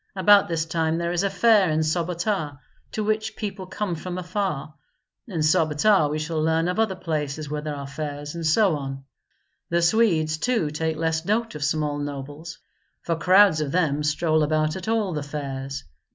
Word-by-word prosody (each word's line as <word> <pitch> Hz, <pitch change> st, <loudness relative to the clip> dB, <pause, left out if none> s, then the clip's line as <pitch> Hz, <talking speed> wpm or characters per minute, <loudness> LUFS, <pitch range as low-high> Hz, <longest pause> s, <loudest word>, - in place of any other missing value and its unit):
About 200 Hz, +2 st, +5 dB
this 165 Hz, -2 st, -1 dB
time 160 Hz, 0 st, 0 dB
there 170 Hz, 0 st, -1 dB
is 175 Hz, 0 st, 0 dB
a 200 Hz, -, +1 dB
fair 200 Hz, -1 st, +4 dB
in 155 Hz, 0 st, +1 dB
Sobota, 170 Hz, -1 st, -1 dB, 0.4 s
to 215 Hz, -, -1 dB
which 215 Hz, 0 st, -1 dB
people 195 Hz, -3 st, -5 dB
come 195 Hz, -1 st, -3 dB
from 175 Hz, +2 st, -5 dB
afar. 180 Hz, -5 st, -3 dB, 0.5 s
In 175 Hz, -8 st, -3 dB
Sobota 155 Hz, +3 st, +3 dB
we 150 Hz, -, -2 dB
shall 155 Hz, +1 st, -2 dB
learn 160 Hz, +1 st, +1 dB
of 180 Hz, +4 st, -1 dB
other 220 Hz, -4 st, +1 dB
places 155 Hz, -4 st, -3 dB
where 150 Hz, 0 st, -2 dB
there 150 Hz, -1 st, -4 dB
are 140 Hz, -1 st, -6 dB
fairs, 145 Hz, +1 st, -5 dB
and 170 Hz, -1 st, -5 dB
so 165 Hz, +3 st, +3 dB
on. 135 Hz, -1 st, -6 dB, 0.7 s
The 170 Hz, 0 st, +1 dB
Swedes 170 Hz, -6 st, +2 dB
too 225 Hz, -11 st, 0 dB
take 160 Hz, +1 st, -2 dB
less 160 Hz, 0 st, 0 dB
note 225 Hz, +5 st, 0 dB
of 150 Hz, -1 st, -5 dB
small 145 Hz, 0 st, 0 dB
nobles, 145 Hz, +3 st, -6 dB, 0.5 s
for 165 Hz, -, 0 dB
crowds 185 Hz, -1 st, +5 dB
of 145 Hz, -2 st, -2 dB
them 150 Hz, -4 st, +1 dB
stroll 155 Hz, +1 st, +1 dB
about 155 Hz, 0 st, +1 dB
at 190 Hz, 0 st, -7 dB
all 220 Hz, -5 st, 0 dB
the 150 Hz, -, -2 dB
fairs. 135 Hz, -2 st, -5 dB
160 Hz, 180 wpm, -24 LUFS, 150-185 Hz, 0.7 s, About